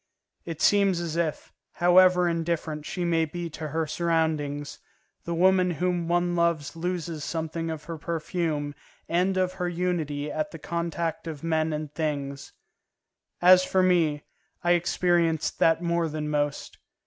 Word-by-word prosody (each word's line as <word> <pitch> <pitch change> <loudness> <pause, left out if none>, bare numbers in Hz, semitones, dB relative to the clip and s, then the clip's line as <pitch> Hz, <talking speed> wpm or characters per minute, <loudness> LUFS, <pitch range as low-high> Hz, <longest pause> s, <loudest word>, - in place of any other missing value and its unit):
It 165 -2 -6
seems 200 -3 +4
as 170 -2 -3
if, 165 -3 -2 0.2
however 180 0 +5
indifferent 165 -2 -2
she 180 -2 -3
may 165 -1 +2
be 170 +1 -5
to 155 +1 -5
her 160 +2 -1
surroundings, 155 -3 -1 0.5
the 170 - -2
woman 185 +1 +4
whom 175 0 0
one 175 0 +1
loves 170 -3 0
loses 170 -2 -3
something 165 +1 -3
of 160 -2 -5
her 160 +1 -7
perfume 160 -2 -2 0.3
and 185 +3 +1
of 185 0 +1
her 180 - 0
unity 165 -5 -2
at 305 0 -2
the - - -9
contact 170 -1 -3
of 155 -2 -6
men 160 -1 +1
and 150 -1 -4
things. 140 -3 -3 0.9
As 185 +1 +8
for 185 0 +2
me, 165 -5 +2 0.4
I 175 - +3
experienced 170 -2 +1
that 165 +1 +3
more 170 -1 0
than 150 0 -4
most. 145 -1 -2
165 Hz, 150 wpm, -26 LUFS, 155-175 Hz, 0.9 s, As